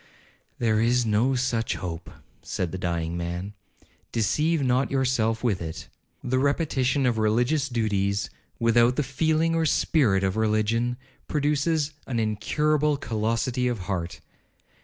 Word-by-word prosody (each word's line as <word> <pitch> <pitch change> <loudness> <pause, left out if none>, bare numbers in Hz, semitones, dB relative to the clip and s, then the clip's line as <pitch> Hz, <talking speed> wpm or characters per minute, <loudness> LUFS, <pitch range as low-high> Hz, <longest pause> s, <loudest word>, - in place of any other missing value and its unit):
'There 110 -2 +1
is 120 +1 +2
no 115 +5 +2
such 120 -3 0
hope,' 85 -3 -6 0.3
said 90 -3 -3
the 95 - -4
dying 85 -2 -2
man, 85 +3 -4 0.6
'deceive 150 +8 +1
not 130 +1 +2
yourself 125 -4 0
with 105 -7 0
it. 80 -1 -6 0.3
The 130 +1 0
repetition 140 -2 +1
of 120 -3 +1
religious 120 +7 +1
duties, 100 - 0 0.3
without 115 +1 +3
the 150 - +1
feeling 160 +4 +1
or 165 -1 +2
spirit 115 - +2
of 95 +2 0
religion, 110 +3 +1 0.3
produces 150 +1 0
an 120 -3 -1
incurable 150 +8 +1
callosity 115 +2 -1
of 120 -5 -2
heart. 90 -2 -4
120 Hz, 130 wpm, -25 LUFS, 105-140 Hz, 0.6 s, without